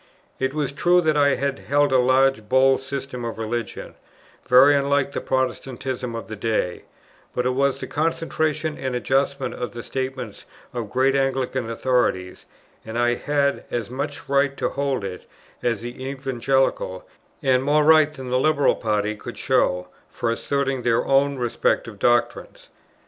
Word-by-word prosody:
It 130 Hz, +2 st, -1 dB
was 145 Hz, -3 st, -1 dB
true 175 Hz, +5 st, +3 dB
that 155 Hz, -2 st, +1 dB
I 140 Hz, -1 st, +4 dB
held 140 Hz, +1 st, 0 dB
a 130 Hz, -, +4 dB
large 130 Hz, -3 st, +2 dB
bold 130 Hz, +1 st, +4 dB
system 135 Hz, -2 st, -5 dB
of 115 Hz, -1 st, -4 dB
religion, 115 Hz, +1 st, -4 dB, 0.5 s
very 130 Hz, +4 st, +7 dB
unlike 140 Hz, 0 st, +1 dB
the -, -, -4 dB
Protestantism 130 Hz, -1 st, -2 dB
of 115 Hz, -, -5 dB
the 110 Hz, -, -7 dB
day, 105 Hz, -4 st, -2 dB, 0.5 s
but 125 Hz, -, 0 dB
it 125 Hz, -, +2 dB
was 135 Hz, +1 st, +1 dB
the -, -, -4 dB
concentration 155 Hz, -1 st, -1 dB
and 130 Hz, -2 st, -3 dB
adjustment 135 Hz, +1 st, 0 dB
of 125 Hz, 0 st, -5 dB
the 120 Hz, -1 st, -7 dB
statements 130 Hz, -5 st, -5 dB, 0.3 s
of 120 Hz, -4 st, -4 dB
great 130 Hz, +3 st, +2 dB
Anglican 135 Hz, -3 st, 0 dB
authorities, 115 Hz, -6 st, -1 dB, 0.4 s
and 110 Hz, +1 st, -6 dB
I 120 Hz, 0 st, +3 dB
had 140 Hz, +2 st, 0 dB
as 120 Hz, -1 st, -3 dB
much 140 Hz, +3 st, -5 dB
right 140 Hz, 0 st, +1 dB
to -, -, 0 dB
hold 140 Hz, -5 st, -2 dB
it, 95 Hz, -2 st, -7 dB, 0.3 s
as 115 Hz, -3 st, -1 dB
the 120 Hz, +2 st, -7 dB
Evangelical, 135 Hz, -7 st, -1 dB, 0.4 s
and 130 Hz, -1 st, +3 dB
more 150 Hz, +2 st, +3 dB
right 155 Hz, -1 st, +6 dB
than 130 Hz, -4 st, -8 dB
the 125 Hz, -, +2 dB
Liberal 145 Hz, 0 st, +3 dB
party 105 Hz, -1 st, -1 dB
could -, -, -9 dB
show, 90 Hz, 0 st, +1 dB, 0.2 s
for 115 Hz, -, -2 dB
asserting 135 Hz, +2 st, -1 dB
their 120 Hz, -1 st, +1 dB
own 140 Hz, 0 st, +2 dB
respective 115 Hz, -3 st, -1 dB
doctrines. 120 Hz, +3 st, 0 dB
130 Hz, 155 wpm, -23 LUFS, 120-140 Hz, 0.5 s, very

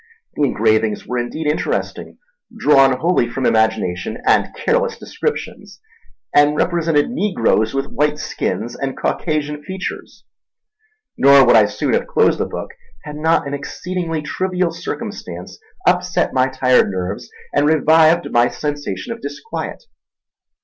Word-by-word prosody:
The -, -, -5 dB
engravings 110 Hz, -5 st, +1 dB
were 125 Hz, 0 st, -2 dB
indeed 120 Hz, +6 st, -4 dB
interesting, 150 Hz, +1 st, -2 dB, 0.4 s
drawn 135 Hz, -9 st, +4 dB
wholly 165 Hz, -8 st, +2 dB
from 130 Hz, +2 st, -3 dB
imagination 110 Hz, -3 st, 0 dB
and -, -, +3 dB
careless 485 Hz, +1 st, 0 dB
descriptions, 455 Hz, -, -5 dB, 0.5 s
and 145 Hz, +1 st, +4 dB
represented 165 Hz, 0 st, +1 dB
negroes 135 Hz, -, +1 dB
with 135 Hz, 0 st, 0 dB
white 150 Hz, +1 st, 0 dB
skins 120 Hz, -5 st, -3 dB
and 135 Hz, -1 st, -4 dB
Caucasian 150 Hz, -2 st, -2 dB
features; 190 Hz, +4 st, -7 dB, 0.9 s
nor 140 Hz, 0 st, +7 dB
would 120 Hz, -, +5 dB
I 110 Hz, -2 st, +6 dB
soon -, -, -2 dB
have -, -, 0 dB
closed -, -, +2 dB
the -, -, -1 dB
book -, -, -6 dB, 0.3 s
had 150 Hz, 0 st, -8 dB
not 160 Hz, +1 st, +1 dB
an 140 Hz, -, -5 dB
exceedingly 165 Hz, +2 st, -4 dB
trivial 180 Hz, +1 st, -1 dB
circumstance 170 Hz, -, -7 dB, 0.3 s
upset 180 Hz, 0 st, +1 dB
my 130 Hz, 0 st, +2 dB
tired 130 Hz, -3 st, +3 dB
nerves 95 Hz, +5 st, -4 dB, 0.2 s
and 145 Hz, +1 st, +3 dB
revived 160 Hz, +2 st, +4 dB
my 120 Hz, 0 st, +4 dB
sensation 145 Hz, -, -4 dB
of 230 Hz, -, -12 dB
disquiet. 145 Hz, -, -6 dB
145 Hz, 130 wpm, -19 LUFS, 125-170 Hz, 0.9 s, nor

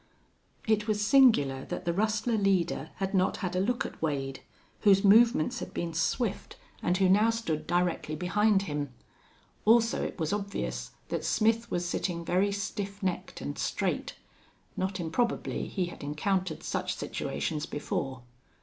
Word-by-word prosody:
It 215 Hz, 0 st, +2 dB
was 210 Hz, -1 st, +1 dB
singular 200 Hz, -, +5 dB
that -, -, -5 dB
the 170 Hz, -, +1 dB
rustler 215 Hz, +4 st, 0 dB
leader 190 Hz, -6 st, +1 dB
had 195 Hz, +1 st, -3 dB
not 190 Hz, -1 st, +2 dB
had 180 Hz, -1 st, -3 dB
a -, -, +2 dB
look 240 Hz, +5 st, 0 dB
at -, -, -8 dB
Wade, 135 Hz, -4 st, -2 dB, 0.4 s
whose 195 Hz, -1 st, +5 dB
movements 220 Hz, -4 st, +5 dB
had -, -, -7 dB
been 170 Hz, -1 st, -2 dB
swift 200 Hz, +6 st, -1 dB, 0.3 s
and 180 Hz, +1 st, +1 dB
who 190 Hz, 0 st, +4 dB
now 210 Hz, +4 st, +5 dB
stood 165 Hz, -10 st, -2 dB
directly 175 Hz, -3 st, 0 dB
behind 195 Hz, +4 st, +2 dB
him. 145 Hz, -6 st, -3 dB, 0.7 s
Also 230 Hz, +1 st, +4 dB
it -, -, -4 dB
was 160 Hz, +1 st, 0 dB
obvious 65 Hz, -, -3 dB, 0.2 s
that -, -, -2 dB
Smith 225 Hz, +2 st, +2 dB
was 175 Hz, 0 st, -1 dB
sitting 170 Hz, -1 st, -2 dB
very 190 Hz, +4 st, +2 dB
stiff 200 Hz, 0 st, -4 dB
necked 185 Hz, -2 st, -3 dB
and -, -, -5 dB
straight. -, -, -1 dB, 0.6 s
Not 190 Hz, +1 st, -2 dB
improbably 175 Hz, +9 st, -1 dB
he 185 Hz, -3 st, -1 dB
had 175 Hz, -, -9 dB
encountered 165 Hz, +3 st, -1 dB
such -, -, -2 dB
situations 70 Hz, -, -3 dB
before. 135 Hz, -3 st, -3 dB
190 Hz, 150 wpm, -29 LUFS, 160-210 Hz, 0.7 s, singular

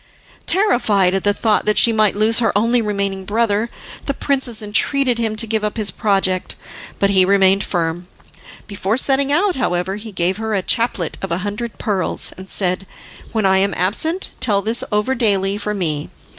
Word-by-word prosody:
Terrified 225 Hz, -, +2 dB
at 195 Hz, -, -1 dB
the 205 Hz, -, +3 dB
thought 210 Hz, +1 st, 0 dB
that 210 Hz, 0 st, +1 dB
she 230 Hz, -, +5 dB
might 215 Hz, -2 st, +2 dB
lose 220 Hz, +2 st, +4 dB
her 230 Hz, -, +2 dB
only 230 Hz, +3 st, +2 dB
remaining 200 Hz, -2 st, -2 dB
brother, 215 Hz, +2 st, 0 dB, 0.4 s
the 280 Hz, -, -1 dB
princess 260 Hz, -7 st, 0 dB
entreated 245 Hz, +4 st, +1 dB
him 220 Hz, -2 st, -1 dB
to 220 Hz, +1 st, +3 dB
give 220 Hz, -1 st, -1 dB
up 210 Hz, +2 st, -3 dB
his 210 Hz, -4 st, +1 dB
project, 195 Hz, -4 st, 0 dB, 0.4 s
but 200 Hz, 0 st, +1 dB
he 190 Hz, -1 st, +4 dB
remained 195 Hz, +1 st, +3 dB
firm. 175 Hz, 0 st, -2 dB, 0.6 s
Before 200 Hz, +2 st, -2 dB
setting 275 Hz, +1 st, +2 dB
out, 365 Hz, +4 st, +1 dB
however, 190 Hz, -5 st, -1 dB
he 215 Hz, +1 st, -9 dB
gave 185 Hz, 0 st, 0 dB
her 220 Hz, -1 st, -2 dB
a 190 Hz, -, -1 dB
chaplet 230 Hz, -8 st, -1 dB
of 195 Hz, -, -5 dB
a 170 Hz, -, 0 dB
hundred 210 Hz, +3 st, -5 dB
pearls, 200 Hz, -5 st, -1 dB
and 190 Hz, +1 st, -11 dB
said, 185 Hz, 0 st, 0 dB, 0.4 s
"When 220 Hz, -3 st, -1 dB
I 190 Hz, 0 st, +4 dB
am 195 Hz, -2 st, 0 dB
absent, 315 Hz, -, 0 dB
tell 200 Hz, -4 st, +1 dB
this 225 Hz, +2 st, 0 dB
over 210 Hz, +5 st, +1 dB
daily 200 Hz, -5 st, +1 dB
for 210 Hz, 0 st, -3 dB
me. 155 Hz, -6 st, -2 dB
210 Hz, 185 wpm, -18 LUFS, 195-230 Hz, 0.6 s, she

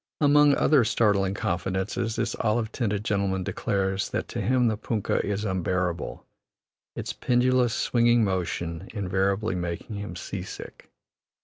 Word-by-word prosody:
Among 145 Hz, -1 st, +5 dB
other 145 Hz, -5 st, +4 dB
startling 100 Hz, -4 st, +2 dB
confidences, 95 Hz, +6 st, -2 dB
this -, -, -1 dB
olive 110 Hz, 0 st, 0 dB
tinted 105 Hz, -4 st, -2 dB
gentleman 100 Hz, -3 st, 0 dB
declares 95 Hz, -1 st, -1 dB
that -, -, -3 dB
to -, -, -3 dB
him 125 Hz, +4 st, +2 dB
the 110 Hz, -, +1 dB
punkah 105 Hz, -1 st, -1 dB
is 105 Hz, +1 st, -2 dB
unbearable, 90 Hz, -2 st, -2 dB, 0.7 s
its -, -, -4 dB
pendulous, 125 Hz, -1 st, +2 dB
swinging 120 Hz, -1 st, +3 dB
motion 90 Hz, -2 st, -2 dB
invariably 100 Hz, +2 st, 0 dB
making 90 Hz, +4 st, -4 dB
him 100 Hz, -4 st, -6 dB
"sea 90 Hz, +2 st, -5 dB
sick." 95 Hz, -, -10 dB
100 Hz, 130 wpm, -26 LUFS, 95-115 Hz, 0.7 s, Among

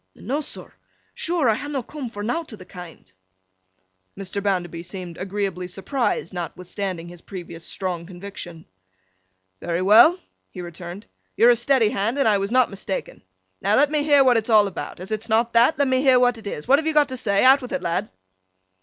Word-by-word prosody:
'No, 275 Hz, +7 st, -3 dB
sir, 300 Hz, -, -8 dB, 0.4 s
sure 335 Hz, -5 st, 0 dB
I 225 Hz, -, +5 dB
ha' 290 Hz, +7 st, -5 dB
not 270 Hz, -5 st, -3 dB
coom 285 Hz, -5 st, -6 dB
for 205 Hz, -2 st, -7 dB
nowt 305 Hz, +8 st, -3 dB
o' -, -, -7 dB
th' 185 Hz, -3 st, -14 dB
kind.' 175 Hz, -, -12 dB, 1.1 s
Mr. 195 Hz, +1 st, -4 dB
Bounderby 180 Hz, -4 st, -1 dB
seemed 175 Hz, -1 st, -7 dB
agreeably 190 Hz, -2 st, -3 dB
surprised, 200 Hz, +6 st, -2 dB
notwithstanding 180 Hz, +1 st, -5 dB
his 175 Hz, -1 st, -12 dB
previous 170 Hz, -3 st, -9 dB
strong 175 Hz, -3 st, -4 dB
conviction. 175 Hz, -3 st, -9 dB, 0.9 s
'Very 170 Hz, +1 st, -2 dB
well,' 225 Hz, -, +7 dB, 0.3 s
he 185 Hz, -, -11 dB
returned. 175 Hz, +3 st, -8 dB, 0.3 s
'You're 240 Hz, +1 st, +7 dB
a -, -, +4 dB
steady 240 Hz, -1 st, +2 dB
Hand, 215 Hz, +6 st, -1 dB
and 275 Hz, -, +2 dB
I 205 Hz, -2 st, +3 dB
was 195 Hz, +1 st, -2 dB
not 255 Hz, -2 st, +3 dB
mistaken. 195 Hz, -1 st, -5 dB, 0.4 s
Now, 205 Hz, -, +2 dB
let 290 Hz, +3 st, +4 dB
me 300 Hz, -1 st, +1 dB
hear 290 Hz, -2 st, +5 dB
what 250 Hz, -2 st, +4 dB
it's 225 Hz, +1 st, -2 dB
all 215 Hz, -2 st, +6 dB
about. 180 Hz, -7 st, -6 dB
As 185 Hz, +4 st, -7 dB
it's 215 Hz, +2 st, -3 dB
not 230 Hz, +2 st, +2 dB
that, 235 Hz, +6 st, +4 dB
let 285 Hz, 0 st, +2 dB
me 260 Hz, 0 st, +2 dB
hear 260 Hz, -2 st, +5 dB
what 245 Hz, -2 st, +2 dB
it 215 Hz, -, -10 dB
is. 150 Hz, -, -6 dB
What 275 Hz, +3 st, +5 dB
have 320 Hz, -, -3 dB
you 315 Hz, -, 0 dB
got 295 Hz, -1 st, +4 dB
to 260 Hz, -, -4 dB
say? 200 Hz, -5 st, +1 dB
Out 265 Hz, +2 st, +7 dB
with 250 Hz, -, -8 dB
it, 275 Hz, -, -3 dB
lad! 185 Hz, +5 st, -1 dB
210 Hz, 200 wpm, -23 LUFS, 185-255 Hz, 1.1 s, well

